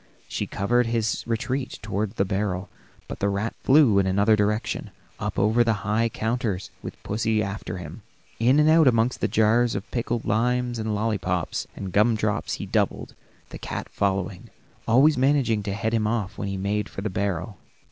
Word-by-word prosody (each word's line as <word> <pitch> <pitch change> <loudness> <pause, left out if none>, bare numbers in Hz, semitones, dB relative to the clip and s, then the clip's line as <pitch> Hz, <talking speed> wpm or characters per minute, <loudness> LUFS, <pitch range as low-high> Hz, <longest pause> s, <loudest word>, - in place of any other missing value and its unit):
She - - -3
covered 120 +4 +1
his 115 -2 -1
retreat 130 +3 -2
toward 105 +1 -2
the 95 - +1
barrel, 95 -1 -2 0.4
but - - -7
the 100 - +1
rat 100 +3 -2
flew 130 -8 +5
in 95 - +2
another 100 +3 +4
direction, 105 +1 -1 0.3
up - - -3
over 110 +4 +3
the 110 -4 -1
high 110 +3 +1
counters, 110 -4 -2
with - - -7
pussy 110 +1 0
after 100 -1 -5
him. 85 +4 -8 0.4
In 125 +6 +4
and 150 - +4
out 160 -1 +6
among 115 0 +3
the - - +1
jars 115 +3 +3
of 100 - -5
pickled 120 -1 -2
limes, 120 +2 0
lollipops 105 -5 -1
and 95 -2 -6
gum 110 +3 +4
drops 105 -1 -1
he - - -4
doubled, - - -1 0.4
the - - -9
cat - - -5
following, 95 -2 -2 0.4
always 135 +4 +5
managing 130 -5 +2
to 100 -1 -3
head 110 +3 -2
him 110 -2 +1
off 105 -3 -2
when 100 - -4
he 100 -1 -3
made 100 +2 -1
for - - -7
the 105 0 -3
barrel. 100 +1 -3
110 Hz, 180 wpm, -25 LUFS, 100-120 Hz, 0.4 s, out